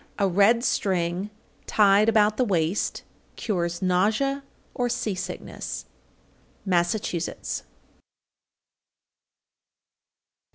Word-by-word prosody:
A 200 - +2
red 205 +6 +4
string 185 -2 0 0.4
tied 205 +1 +5
about 215 -1 +3
the 255 - +3
waist 180 -3 0 0.3
cures 175 -4 -2
nausea 215 +10 +1 0.3
or 245 -1 -1
sea 235 -3 -1
sickness. 185 +1 -6 0.8
_Massachusetts. 175 -1 -1
200 Hz, 75 wpm, -25 LUFS, 180-220 Hz, 0.8 s, tied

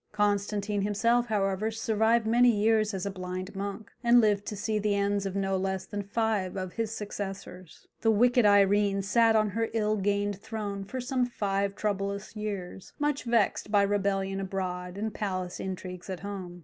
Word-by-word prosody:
Constantine 205 0 0
himself, 230 +4 +2
however, 200 -1 0
survived 225 +1 +1
many 240 +2 +5
years 215 -1 +3
as 190 -1 -4
a 200 - -2
blind 185 +1 -6
monk, 200 +2 -5
and 240 +1 +6
lived 205 -3 +2
to 210 - -3
see 215 +1 -1
the 205 -1 +1
ends 200 0 0
of 190 - -5
no 195 -1 0
less 190 0 -2
than 205 - -4
five 200 -2 -1
of 185 -1 -4
his 225 -1 -2
successors. 195 -4 -7
The 225 - +3
wicked 245 +3 +4
Irene 200 -1 +4
sat 225 +3 +4
on 215 -1 +3
her 225 +3 -1
ill 215 -1 +1
gained 205 0 0
throne 200 -3 -4
for 260 +6 -5
some 250 0 0
five 200 -3 -1
troublous 200 0 -3
years, 200 -3 -5
much 295 -2 -1
vexed 230 -3 +1
by 205 -1 +5
rebellion 195 -1 0
abroad 185 -1 -4
and 215 +1 -3
palace 185 -4 -3
intrigues 185 -1 -6
at 185 -2 -5
home. 185 -3 -6
205 Hz, 175 wpm, -28 LUFS, 195-220 Hz, -, and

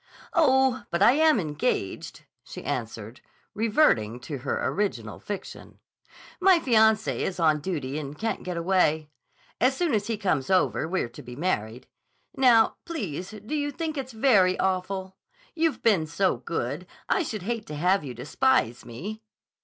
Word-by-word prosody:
"Oh, 265 -5 +3
but 170 +3 +1
I 235 - +8
am 310 -1 +4
engaged," 150 - -3 0.2
she - - -9
answered, 115 -1 -5 0.3
reverting 205 - +2
to 140 +2 -6
her 135 +2 -2
original 125 - -2
fiction. 200 -2 -8 0.6
"My 375 0 +6
fiancé 220 -6 +3
is 180 -2 -3
on 155 -2 +3
duty 145 -4 -3
and 145 0 -7
can't 225 +1 -2
get 180 -1 -5
away. 165 -4 +1 0.5
As 260 +3 +2
soon 345 -6 0
as 210 -1 0
he 225 -2 -1
comes 185 -10 -1
over 185 -4 +2
we're 185 -6 -1
to 120 - -11
be 125 - -10
married. 125 - -2 0.5
Now, 240 -4 +4
please, 190 - -5 0.2
do 265 - -5
you 290 -1 0
think 315 +2 -4
it's 265 -2 -5
very 210 -6 +4
awful? 190 0 -2 0.4
You've 320 -7 0
been 190 -9 +3
so 185 -1 +1
good, 130 +7 -4 0.2
I 385 - +2
should 215 - -4
hate 225 +1 -3
to 150 - -6
have 180 +3 +2
you 130 -4 -7
despise 125 - +1
me." 190 - -7
190 Hz, 155 wpm, -26 LUFS, 150-240 Hz, 0.6 s, I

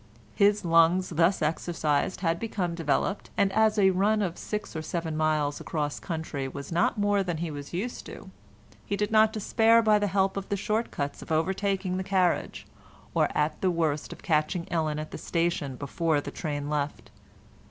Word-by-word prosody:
His 205 -1 +3
lungs 165 +2 +4
thus 170 +2 +2
exercised 155 +1 0
had 165 -2 +1
become 195 -6 -2
developed, 165 +4 -1
and 195 -1 +2
as 220 0 +3
a 190 -2 +5
run 205 +3 +2
of 175 -3 -2
six 210 -4 -5
or 160 - -2
seven 160 0 -3
miles 155 -2 0
across 150 -2 -3
country 160 -5 -4
was 140 +3 -8
not 170 +5 +1
more 205 -1 +2
than 175 -3 -2
he 165 0 -3
was 145 -1 -7
used 210 +8 -4
to, - - -10 0.5
he 200 - -3
did 210 +1 -1
not 220 0 +5
despair 225 +2 +3
by 215 -1 +4
the 205 - +1
help 195 0 +1
of 195 - -5
the 200 - 0
short 215 +4 -1
cuts 140 -4 -4
of - - -9
overtaking 190 +3 0
the 190 - -2
carriage, 185 -2 0 0.5
or - - +2
at 150 +1 0
the 190 - +3
worst 160 -4 -1
of - - -10
catching 160 +2 0
Ellen 155 -3 0
at 155 0 -5
the - - -7
station 165 -5 -1
before 150 +3 0
the - - -6
train 145 -3 -4
left. 145 -1 -3
175 Hz, 185 wpm, -27 LUFS, 155-200 Hz, 0.5 s, a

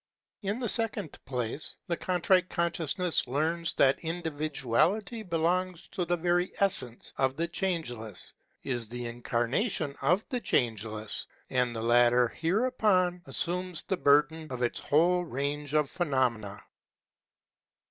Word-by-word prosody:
In 205 +3 -2
the 245 - -1
second 225 - 0
place, 125 +2 -3
the 175 -3 -1
Contrite 180 +1 +2
Consciousness 170 -1 0
learns 160 +5 0
that 135 0 +4
individuality 160 - 0
belongs 180 0 -1
to 185 -3 -2
the 175 +1 0
very 175 +2 +1
essence 125 -12 0
of 130 0 +2
the 165 +3 -1
Changeless, 155 - -3 0.3
is 120 -4 -2
the 120 +1 -5
incarnation 120 - -1
of 180 +9 +2
the 250 - -1
Changeless; 110 - -1 0.2
and 125 -2 +1
the 110 - -3
latter 120 +1 +5
hereupon 185 - +1
assumes 180 -1 0
the 190 - -1
burden 150 +2 +3
of 130 - -3
this 120 - 0
whole 175 +4 +3
range 145 0 -3
of 150 -2 +3
phenom 130 -9 +1
ena. 105 -1 -9
160 Hz, 125 wpm, -29 LUFS, 125-180 Hz, 0.3 s, latter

